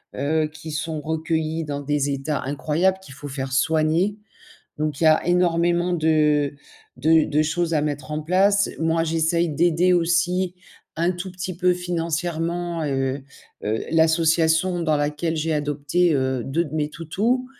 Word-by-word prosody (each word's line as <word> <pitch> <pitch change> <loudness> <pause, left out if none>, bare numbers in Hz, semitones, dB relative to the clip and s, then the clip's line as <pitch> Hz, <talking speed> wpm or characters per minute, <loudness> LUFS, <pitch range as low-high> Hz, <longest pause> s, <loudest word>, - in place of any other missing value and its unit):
heu, 155 +2 0
qui 160 0 -8
sont 155 0 -3
recueillis 160 +1 -2
dans 145 -1 -4
des 145 0 0
états 140 +2 -2
incroyables 155 +7 0
qu'il 165 -8 -12
faut 145 +1 -8
faire 135 -1 -4
soigner. 160 +7 +2 0.6
Donc 150 -1 -2
il - - +3
y - - +7
a 155 0 +4
énormément 175 0 +2
de 150 -3 +2 0.4
de 160 +4 +4
de 150 0 +2
choses 165 +2 -1
à 150 - +2
mettre 145 -1 -3
en 155 0 -2
place. 200 +4 +3
Moi, 165 0 +1
j'essaie 165 +1 +1
d'aider 170 +3 +2
aussi, 175 +1 +1 0.4
un 170 +2 +2
tout 185 +1 -6
petit 185 0 -5
peu 180 0 +3
financièrement, 170 -1 -2
heu 135 -1 -1 0.4
heu, 110 +2 -1
l'association 165 +2 +3
dans 155 -2 +1
laquelle 150 +3 -1
j'ai 160 +1 -1
adopté, 150 +3 +1
heu, 130 -2 0
2 160 +6 0
de 155 - -10
mes 150 -1 -1
toutous. 205 +11 -1
160 Hz, 155 wpm, -23 LUFS, 150-175 Hz, 0.6 s, y